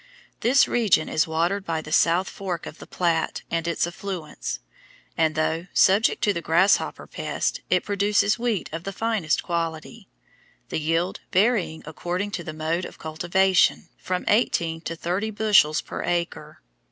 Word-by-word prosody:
This 260 Hz, +4 st, +4 dB
region 215 Hz, -9 st, +2 dB
is 155 Hz, -, +1 dB
watered 170 Hz, +5 st, 0 dB
by 165 Hz, -3 st, -2 dB
the 155 Hz, -, -9 dB
South 175 Hz, +4 st, +3 dB
Fork 185 Hz, -4 st, -5 dB
of 155 Hz, -, -9 dB
the -, -, -11 dB
Platte 170 Hz, -2 st, -1 dB
and 165 Hz, 0 st, -1 dB
its 170 Hz, -1 st, +1 dB
affluents, 175 Hz, -2 st, -5 dB, 0.6 s
and, 160 Hz, -2 st, +1 dB
though 160 Hz, +2 st, -1 dB
subject 200 Hz, +4 st, +4 dB
to 205 Hz, -, +3 dB
the 170 Hz, -, -3 dB
grasshopper 170 Hz, +5 st, +2 dB
pest, -, -, -3 dB
it 180 Hz, -1 st, +2 dB
produces 205 Hz, +1 st, +1 dB
wheat 235 Hz, -5 st, -1 dB
of 165 Hz, +1 st, -4 dB
the 195 Hz, -, -5 dB
finest 220 Hz, -7 st, 0 dB
quality, 170 Hz, +5 st, -4 dB, 0.6 s
the -, -, -2 dB
yield 165 Hz, +4 st, 0 dB
varying 195 Hz, -5 st, +1 dB
according 175 Hz, +6 st, -3 dB
to 175 Hz, -, -4 dB
the 160 Hz, -, -5 dB
mode 160 Hz, +3 st, -2 dB
of -, -, -10 dB
cultivation 175 Hz, +3 st, +2 dB
from 185 Hz, -1 st, -3 dB
eighteen 170 Hz, -7 st, +1 dB
to 165 Hz, -, -5 dB
thirty 180 Hz, +6 st, -2 dB
bushels 205 Hz, -8 st, +3 dB
per -, -, -6 dB
acre. 170 Hz, -, -3 dB
175 Hz, 155 wpm, -24 LUFS, 165-200 Hz, 0.6 s, This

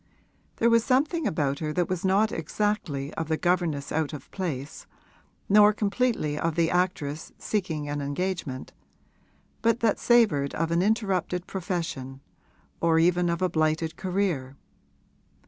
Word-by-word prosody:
There 235 Hz, +1 st, +3 dB
was 230 Hz, -1 st, +5 dB
something 290 Hz, +5 st, +1 dB
about 140 Hz, -3 st, -1 dB
her 155 Hz, -1 st, -2 dB
that 175 Hz, -1 st, +1 dB
was 180 Hz, -2 st, -3 dB
not 195 Hz, +3 st, +3 dB
exactly 165 Hz, -5 st, -2 dB
of 160 Hz, -, -3 dB
the 160 Hz, 0 st, 0 dB
governess 170 Hz, -6 st, 0 dB
out 155 Hz, -1 st, -1 dB
of 145 Hz, -3 st, -9 dB
place 155 Hz, -6 st, -5 dB, 0.6 s
nor 210 Hz, +1 st, +6 dB
completely 205 Hz, -8 st, 0 dB
of 165 Hz, -1 st, -1 dB
the 165 Hz, -1 st, +2 dB
actress 170 Hz, -5 st, -1 dB
seeking 165 Hz, -8 st, -2 dB
an 145 Hz, 0 st, -3 dB
engagement, 145 Hz, -2 st, -3 dB, 0.9 s
but 230 Hz, +1 st, +2 dB
that 225 Hz, -3 st, +2 dB
savoured 210 Hz, -, +3 dB
of 165 Hz, +1 st, -1 dB
an 170 Hz, +1 st, +2 dB
interrupted 190 Hz, -4 st, 0 dB
profession 165 Hz, -8 st, -4 dB, 0.6 s
or 165 Hz, -1 st, +3 dB
even 175 Hz, +1 st, +3 dB
of 170 Hz, +2 st, -1 dB
a -, -, +4 dB
blighted 155 Hz, 0 st, 0 dB
career. 180 Hz, -9 st, -2 dB
170 Hz, 140 wpm, -26 LUFS, 150-200 Hz, 0.9 s, nor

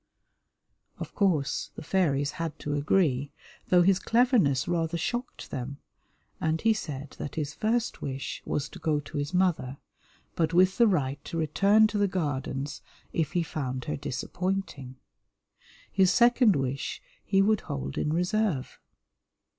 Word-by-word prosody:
Of -, -, -7 dB
course, 160 Hz, -8 st, +1 dB
the -, -, -8 dB
fairies 145 Hz, -6 st, +1 dB
had 165 Hz, -3 st, -4 dB
to 145 Hz, -, -4 dB
agree, 145 Hz, -2 st, +1 dB, 0.4 s
though 180 Hz, -1 st, +5 dB
his 190 Hz, +1 st, +4 dB
cleverness 225 Hz, -, +3 dB
rather 170 Hz, -1 st, 0 dB
shocked 240 Hz, +9 st, -4 dB
them, 130 Hz, +2 st, -5 dB, 0.6 s
and 160 Hz, 0 st, 0 dB
he 225 Hz, +3 st, +3 dB
said 145 Hz, -8 st, -6 dB
that 145 Hz, -, -5 dB
his 150 Hz, -2 st, -3 dB
first 230 Hz, +2 st, -1 dB
wish 135 Hz, -1 st, -4 dB
was 145 Hz, -, -2 dB
to -, -, -11 dB
go 155 Hz, -2 st, +1 dB
to 145 Hz, -, -8 dB
his 145 Hz, +1 st, -3 dB
mother, 175 Hz, -8 st, +1 dB, 0.6 s
but 165 Hz, 0 st, 0 dB
with 185 Hz, +3 st, +4 dB
the 235 Hz, -, +7 dB
right 145 Hz, -8 st, 0 dB
to 170 Hz, -, -5 dB
return 200 Hz, +7 st, +4 dB
to 215 Hz, -1 st, 0 dB
the 205 Hz, -, +3 dB
Gardens 145 Hz, -5 st, -3 dB, 0.3 s
if 155 Hz, -1 st, -1 dB
he 175 Hz, -2 st, +2 dB
found 130 Hz, -5 st, -4 dB
her 150 Hz, -, -2 dB
disappointing. 145 Hz, 0 st, -3 dB, 1.0 s
His 190 Hz, -2 st, +4 dB
second 240 Hz, -3 st, +5 dB
wish 135 Hz, 0 st, -2 dB, 0.2 s
he 195 Hz, -1 st, +3 dB
would 215 Hz, 0 st, +2 dB
hold 70 Hz, 0 st, -5 dB
in 150 Hz, -, -1 dB
reserve. 180 Hz, -3 st, 0 dB
160 Hz, 145 wpm, -28 LUFS, 140-195 Hz, 1.0 s, the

